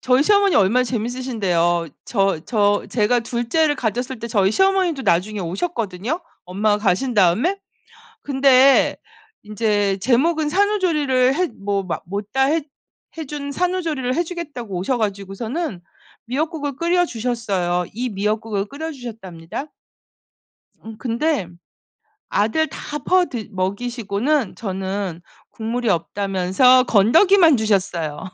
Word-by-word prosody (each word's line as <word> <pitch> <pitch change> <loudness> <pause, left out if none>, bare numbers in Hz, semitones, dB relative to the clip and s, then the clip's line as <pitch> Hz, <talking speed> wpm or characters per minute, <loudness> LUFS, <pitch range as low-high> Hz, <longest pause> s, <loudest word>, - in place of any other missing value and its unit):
저희 255 +1 +3
시어머니 400 +2 +3
얼마나 225 +6 +4
재밌으신데요. 215 -9 -1 0.2
저 195 -6 +1
저 205 -3 +2
제가 235 +1 +2
둘째를 240 +7 0
가졌을 245 +1 -3
때 235 - -5
저희 195 -4 +2
시어머니도 380 - +2
나중에 200 +1 +1
오셨거든요, 210 - -3 0.2
엄마가 205 +3 0
가신 215 +5 0
다음에. 215 - +3 0.7
근데 270 -1 +4 0.5
인제 210 -2 0
제목은 295 - +1
산후조리를 305 -9 +2
해 365 +3 +1
뭐 200 -7 -3
마 180 - -3
못 200 +3 -5
다 265 0 +2
했 310 +3 +1 0.5
해 320 - -4
준 285 0 -5
산후조리를 325 -7 -1
해 345 - +1
주겠다고 295 - -7
오셔 220 +8 -1
가지고서는 205 - -3 0.4
미역국을 290 +2 -3
끓여 350 +2 +2
주셨어요. 210 - -2
이 245 +4 -3
미역국을 210 0 -2
끓여 310 +8 -6
주셨답니다. 225 - -8 1.1
음. 220 -1 -9
근데 235 - -1 0.8
아들 225 +10 +1
다 295 - -6
퍼드 300 - 0
먹이시고는 225 +5 -1
저는 190 -3 -4 0.3
국물이 230 +1 -3
없다면서 195 - +3
건더기만 320 - +5
주셨어요. 185 -8 -1
235 Hz, 290 characters per minute, -21 LUFS, 200-290 Hz, 1.1 s, 건더기만